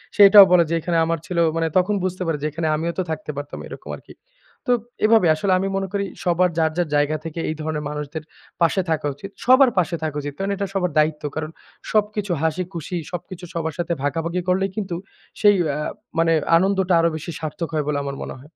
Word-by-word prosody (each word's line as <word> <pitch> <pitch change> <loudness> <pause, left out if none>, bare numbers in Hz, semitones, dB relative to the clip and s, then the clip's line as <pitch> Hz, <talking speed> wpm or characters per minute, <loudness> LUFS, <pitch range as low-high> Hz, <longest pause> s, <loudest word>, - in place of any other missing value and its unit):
সে 205 - +4
এটাও 200 -1 +10
বলে 175 -2 +6
যে - - -1
"এখানে 170 +1 -1
আমার 165 -1 -1
ছেলেও" 170 -2 +1
মানে 165 0 +1
তখন 195 +3 +2
বুঝতে 185 0 -3
পারে 160 -2 0
যে - - +1
এখানে 160 +1 -2
আমিও 165 +2 -1
তো - - +2
থাকতে 155 -1 -4
পারতাম, 145 +1 -6
এরকম - - -9
আরকি। - - -16 0.5
তো - - +6 0.3
এভাবে 220 -5 +5
আসলে 185 +4 +1
আমি 195 - -1
মনে 195 0 -2
করি 200 0 0 0.2
সবার 180 0 +3
যার, 160 -1 +2
যার, 175 -2 +1
জায়গা 145 +1 +2
থেকে 165 +1 -5
এই 155 - -2
ধরনের 155 -1 -3
মানুষদের 150 +1 -5 0.4
পাশে 170 +3 +3
থাকা 155 -2 0
উচিত, 195 +7 -9 0.2
সবার 260 +1 +7
পাশে 175 -1 +2
থাকা 155 -2 -2
উচিত। 145 0 -5
কারণ 195 +1 -2
এটা 200 0 -3
সবার 180 -3 0
দায়িত্ব। 155 0 +2
কারণ 155 0 -3 0.4
সবকিছু 210 -2 0
হাসি, 160 +3 0
খুশি 170 +2 -5 0.2
সবকিছু 180 +1 -7
সবার 160 -1 -2
সাথে 170 0 0
ভাগাভাগি 165 +5 -1
করলেই 190 +1 +1
কিন্তু 195 -5 -3 0.5
সেই 205 -1 +6
অ্যা 145 - -1 0.4
মানে 165 0 +3 0.2
আনন্দটা 190 0 +1
আরো 165 0 +3
বেশি 170 - -6
সার্থক 160 +1 -4
হয় 150 -2 0
বলে 150 - 0
আমার 140 0 -4
মনে - - -6
হয়। 145 +4 -16
170 Hz, 215 wpm, -22 LUFS, 155-190 Hz, 0.5 s, এটাও